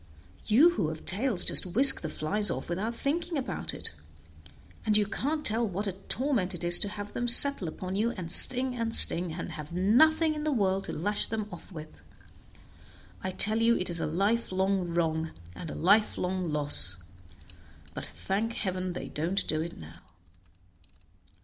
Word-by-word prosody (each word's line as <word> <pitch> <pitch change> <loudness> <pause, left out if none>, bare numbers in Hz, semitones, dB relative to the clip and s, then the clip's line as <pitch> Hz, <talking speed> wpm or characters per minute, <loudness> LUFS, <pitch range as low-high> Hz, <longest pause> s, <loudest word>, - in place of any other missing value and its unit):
You 285 +11 +3
who 190 - -4
have 155 0 -10
tails 215 0 0
just - - +10
whisk 270 +3 +8
the 160 - -7
flies 205 +8 -2
off 130 +5 -6
without 210 +7 -5
thinking 325 +5 -4
about 265 - -5
it, - - -5 0.9
and 210 -1 +1
you 210 - 0
can't 295 +9 -5
tell 225 +2 -1
what 200 +2 -6
a 195 - -3
torment 195 0 -4
it 175 - -8
is 175 0 +9
to 205 - -2
have 205 0 -10
them 240 - -5
settle 245 -4 +5
upon 185 +4 -8
you 220 +4 -2
and 180 -7 -8
sting 255 +4 +3
and 230 -1 -4
sting, 175 0 +3
and 170 - -8
have 150 0 -11
nothing 310 - +1
in 300 -1 -8
the 305 - -3
world 195 -6 -2
to - - -7
lash 205 +6 0
them 220 -2 -6
off - - -13
with. 155 -3 -13 1.2
I 190 - -4
tell 215 +4 +4
you 235 +1 +1
it 180 - -4
is 170 - -2
a - - -4
lifelong 190 0 -3
wrong, 160 -1 -4 0.2
and 165 - -10
a - - -9
lifelong 185 -2 -1
loss; 145 -12 +4 1.0
but - - -9
thank 215 +4 -5
heaven, 185 -4 -5
they - - -9
don't 170 +6 -4
do 155 0 -2
it 170 +1 -9
now." 80 +1 -15
195 Hz, 175 wpm, -26 LUFS, 175-230 Hz, 1.2 s, just